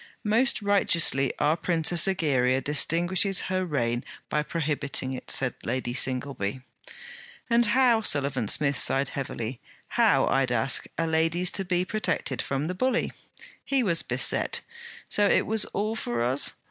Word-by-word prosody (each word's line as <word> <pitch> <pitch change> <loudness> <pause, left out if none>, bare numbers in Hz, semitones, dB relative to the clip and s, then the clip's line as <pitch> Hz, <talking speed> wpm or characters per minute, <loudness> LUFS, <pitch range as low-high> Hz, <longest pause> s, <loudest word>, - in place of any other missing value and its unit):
'Most 225 +2 +2
righteously 170 -9 +3
our 150 +2 +2
Princess 170 0 +2
Egeria 135 -9 +1
distinguishes 175 +7 +1
her 185 0 0
reign 120 -8 -1 0.3
by 150 - 0
prohibiting 145 -4 -2
it,' 130 - -8
said 130 -2 0
Lady 120 0 -3
Singleby. 130 -3 -2 0.9
'And 235 -1 +4
how,' 240 0 +3
Sullivan 140 - 0
Smith 140 +4 +3
sighed 135 0 +2
heavily, 125 -3 -5 0.3
'how, - - +3
I'd 135 -1 +1
ask, 125 +3 0
are 165 - 0
ladies 165 +3 +1
to 195 - -3
be 180 0 0
protected 185 - -2
from 140 +1 -3
the 180 - -3
bully?' 250 +6 0 0.5
He 270 -2 +1
was 170 -6 +1
beset: - - +1 0.5
'So 205 0 +2
it - - +3
was 220 0 +2
all 215 +2 -3
for 120 - -2
us? 130 +4 +1
155 Hz, 145 wpm, -26 LUFS, 130-195 Hz, 0.9 s, And